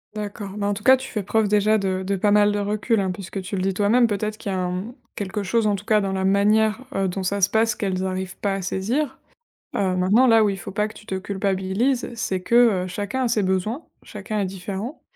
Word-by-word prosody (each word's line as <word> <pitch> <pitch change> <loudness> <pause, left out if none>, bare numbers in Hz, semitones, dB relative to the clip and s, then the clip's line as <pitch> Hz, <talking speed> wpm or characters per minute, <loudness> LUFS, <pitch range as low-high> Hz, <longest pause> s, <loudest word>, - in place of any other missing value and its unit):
D'accord, 205 -1 -5
bah, 205 0 -1
en 205 - +1
tout 210 +1 -7
cas 260 +1 +7
tu 265 +1 -8
fais 210 - -2
preuve 215 +2 +1
déjà 210 +1 +3
de 190 -2 -1
de 200 +1 -1
pas 205 +2 +1
mal 205 0 +5
de 205 - -1
recul, 210 +2 0
hein, 190 -1 0
puisque 190 0 -6
tu 185 +2 -5
le 185 - -1
dis 190 0 0
toi-même, 225 +5 +3
peut-être 215 +1 -2
qu'il 200 - -5
y - - -1
a - - -1
un, 180 0 -1
mmh 235 +4 -8 0.2
quelque 205 +1 -3
chose 225 +3 +1
en 205 -1 +2
tout 190 - -7
cas 215 -1 +3
dans 195 -1 -1
la 190 0 -1
manière, 210 +3 +3 0.2
heu, 195 -1 +1
dont 190 +1 -3
ça 200 +2 -1
se 190 - +4
passe 220 0 +2
qu'elles 190 -3 -2
arrivent 185 0 -4
pas 200 -1 -1
à 195 - -3
saisir, 230 +10 -2 0.6
heu, 185 -2 +1
maintenant 205 +8 +4
là 225 -1 +6
où 205 - +3
il 195 -1 -3
faut 195 - -7
pas 210 +1 0
que - - -12
tu 215 - -15
te 190 - -3
culpabilises, 195 +6 -1
c'est 190 -5 -2
que, 230 -4 +4
heu, - - -4
chacun 205 +7 -3
a - - +2
ses 220 -3 +2
besoins, 190 - -1 0.2
chacun 215 -1 -5
est - - 0
différent. 195 - -6
205 Hz, 260 wpm, -23 LUFS, 190-220 Hz, 0.6 s, cas